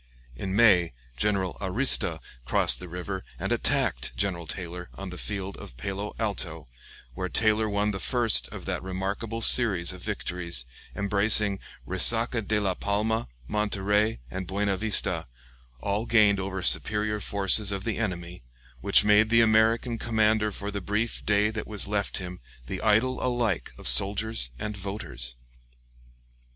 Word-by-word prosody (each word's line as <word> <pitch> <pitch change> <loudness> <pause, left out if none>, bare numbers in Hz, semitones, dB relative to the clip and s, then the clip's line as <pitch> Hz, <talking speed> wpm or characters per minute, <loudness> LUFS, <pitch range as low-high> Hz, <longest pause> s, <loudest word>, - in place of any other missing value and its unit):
In 95 +9 -4
May, 95 - +4 0.2
General 95 +5 -1
Arista 95 -3 +3 0.3
crossed 65 - +2
the 90 - -9
river 90 +2 -6
and - - -4
attacked - - 0
General 90 -4 -2
Taylor 90 +2 -6
on 95 -1 -7
the 90 - -8
field 100 -2 -4
of - - -11
Palo 100 +8 -5
Alto, 90 -8 -3 0.5
where 90 +7 -4
Taylor 110 +1 +2
won 105 +1 0
the 95 - -5
first 120 +2 +3
of - - -10
that - - -3
remarkable 100 +5 -4
series 100 -10 +5
of 90 - -11
victories, 85 -11 -4 0.3
embracing 100 0 +3 0.3
Resaca 115 +5 +3
de 105 +1 -1
la 100 -3 0
Palma, 110 +4 -2 0.2
Monterey, 105 - 0
and 95 -1 -5
Buena 100 +1 -1
Vista, 110 +3 0 0.5
all 100 +3 -2
gained 105 -3 +4
over 95 -1 -4
superior 105 +1 +1
forces 100 +1 +2
of 100 -1 -4
the 110 -1 -3
enemy, 90 - -4 0.4
which - - +4
made 105 +1 +4
the 115 0 +5
American 115 +1 +2
commander 110 -1 +1
for 100 +1 -6
the 100 0 -5
brief 105 +5 -2
day 105 +1 +2
that 110 0 -6
was 105 -2 -2
left 100 -1 -2
him 90 -1 -7 0.3
the - - -6
idol 110 +4 +1
alike 120 -7 -1
of - - -4
soldiers 100 - +4
and 105 - -5
voters. 95 - -6
100 Hz, 145 wpm, -26 LUFS, 95-110 Hz, 0.5 s, series